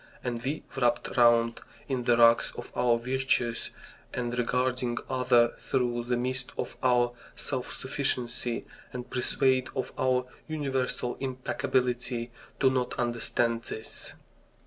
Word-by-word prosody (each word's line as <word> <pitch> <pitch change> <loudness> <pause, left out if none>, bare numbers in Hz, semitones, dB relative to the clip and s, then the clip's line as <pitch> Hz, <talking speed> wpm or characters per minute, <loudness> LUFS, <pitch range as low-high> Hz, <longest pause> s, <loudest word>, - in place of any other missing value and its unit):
And 120 -2 -2
we, 140 +5 -2
wrapped 120 -2 +1
round 115 -1 +4 0.3
in 130 -4 -1
the 120 -1 +4
rags 115 0 +6
of 120 - -7
our 120 -1 +3
virtues, 125 -1 0 0.5
and 120 -1 -2
regarding 125 0 0
others 125 -2 +3
through 120 -2 0
the 125 0 +1
mist 130 +1 -2
of - - -3
our 120 -1 +4 0.2
self 130 -3 -3
sufficiency, 125 -3 -2 0.3
and 125 -1 -7
persuaded 130 0 +2
of - - -2
our 130 -1 +2 0.2
universal 135 -5 -1
impeccability, 125 -2 -1 0.3
do 130 -1 +5
not 125 -1 -1
understand 120 -1 0
this. 110 - -7
125 Hz, 125 wpm, -29 LUFS, 120-130 Hz, 0.5 s, rags